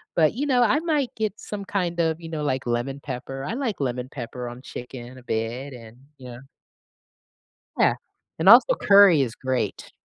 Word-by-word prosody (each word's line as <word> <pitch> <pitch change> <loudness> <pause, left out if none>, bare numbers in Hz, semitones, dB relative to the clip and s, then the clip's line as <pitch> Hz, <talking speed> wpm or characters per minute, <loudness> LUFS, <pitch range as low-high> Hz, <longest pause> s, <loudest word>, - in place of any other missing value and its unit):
but, 155 -2 +3
you 275 +5 -2
know, 255 -4 +2
I 240 +6 +3
might 305 -6 0
get 215 -2 -3
some 205 -1 -6
kind 180 -4 -2
of, 160 -1 +1
you 165 - -9
know, 155 -2 -4
like 135 -1 -1
lemon 120 +4 -2
pepper. 135 0 -6
I - - -3
like 240 -5 -3
lemon 125 -2 -3
pepper 125 -1 -6
on 120 +1 -10
chicken 125 0 -9
a - - -17
bit 120 +5 -3
and, 115 -1 -12 0.2
you 130 - -11
know. 120 - -10 1.4
Yeah, - - +3 0.4
and 165 - 0
also, 250 - +8
curry 200 -6 +6
is 120 -4 -2
great. 130 -1 -3
140 Hz, 185 wpm, -24 LUFS, 125-200 Hz, 1.4 s, also